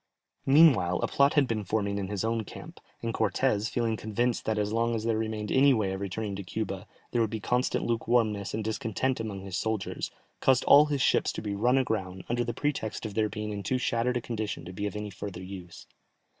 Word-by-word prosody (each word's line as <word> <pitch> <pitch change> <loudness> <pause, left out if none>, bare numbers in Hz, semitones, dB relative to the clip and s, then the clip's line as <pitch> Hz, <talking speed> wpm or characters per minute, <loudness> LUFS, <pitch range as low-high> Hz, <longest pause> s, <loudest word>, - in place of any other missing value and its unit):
Meanwhile 135 - +6
a - - +1
plot 140 +2 +3
had 145 -3 +4
been 110 -3 -1
forming 100 0 -1
in 95 - -3
his 100 +1 -2
own 115 0 0
camp, - - -10 0.2
and 115 0 -1
Cortès, 110 +1 +1
feeling 115 -2 0
convinced 115 +3 -1
that 110 -1 0
as 105 0 0
long 115 +1 +1
as 110 - -2
there 115 -1 +1
remained 110 -1 -2
any 135 0 +5
way 100 -4 0
of 95 - -5
returning 100 +1 -3
to 100 - -5
Cuba, 90 - -4 0.2
there 120 - +2
would 110 - +2
be 110 - -4
constant 125 +4 0
lukewarmness 115 -4 +1
and 110 - -2
discontent 115 +4 -1
among 105 -4 -4
his 95 -2 -4
soldiers, 110 -2 -2 0.3
caused 130 -2 +3
all 150 +1 +7
his 140 -3 0
ships - - +3
to - - -5
be 105 -2 -2
run 120 +6 +3
aground, 95 -8 -1
under 120 0 +1
the 120 - -2
pretext 120 -4 -2
of 110 - -4
their 110 0 +1
being 105 0 -4
in 100 -1 -4
too 125 +7 0
shattered 125 0 0
a - - -2
condition 110 -7 -4
to 90 - -8
be 105 +2 -2
of 100 - -6
any 105 -1 -4
further 95 -1 -7
use. 90 -2 -9
110 Hz, 225 wpm, -28 LUFS, 100-120 Hz, 0.3 s, all